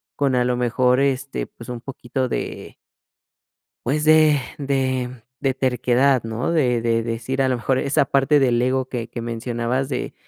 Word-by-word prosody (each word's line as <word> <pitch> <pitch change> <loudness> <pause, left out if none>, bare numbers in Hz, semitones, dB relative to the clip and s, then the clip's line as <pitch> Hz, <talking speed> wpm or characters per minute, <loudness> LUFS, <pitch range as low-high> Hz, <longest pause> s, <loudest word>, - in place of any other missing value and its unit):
con, 140 -2 +1
a 125 0 +2
lo 125 0 +1
mejor, 125 +1 +2
este, 135 0 -1
pues, 115 - -13
un 120 -1 -6
poquito 130 0 -4
de - - -5 1.1
pues, 150 +1 0
de 155 -2 +5 0.2
de 130 -3 -1 0.2
de 135 -1 +1
terquedad, 130 0 +2
¿no?, 115 +8 -2
de 125 -7 +2
de 115 0 +1
decir 120 +4 -2
a 130 - +2
lo 125 - 0
mejor, 130 +2 0
esa 140 0 +2
parte 140 +3 +3
del 120 -3 +2
ego 130 +1 +1
que 120 -3 -5
que 120 - -6
mencionabas 120 +3 -2
de 135 - -3
130 Hz, 170 wpm, -22 LUFS, 120-135 Hz, 1.1 s, de